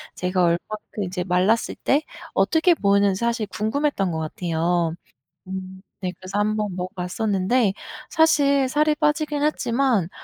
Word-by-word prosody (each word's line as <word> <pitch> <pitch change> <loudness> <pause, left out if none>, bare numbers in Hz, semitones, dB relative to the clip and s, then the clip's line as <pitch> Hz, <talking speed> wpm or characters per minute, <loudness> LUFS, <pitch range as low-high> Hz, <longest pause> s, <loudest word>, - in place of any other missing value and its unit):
제가 180 0 0
얼만큼 205 +5 -2
이제 180 -1 -3
말랐을 190 +5 +1
때 280 +2 +3 0.3
어떻게 335 +2 +3
보이는지 200 - +2
사실 235 -1 0
궁금했던 215 -1 -1
것 160 - -2
같아요. 165 +1 -1 0.5
음 190 0 -7 0.2
네. 185 -1 -2
그래서 185 +2 -5
1 215 +1 +1
번 210 -4 -2
먹어 180 0 -3
봤었는데 195 +3 0 0.4
사실 280 -4 +3
살이 300 +2 +2
빠지긴 300 0 0
했지만 245 - +1
205 Hz, 295 characters per minute, -23 LUFS, 180-275 Hz, 0.5 s, 때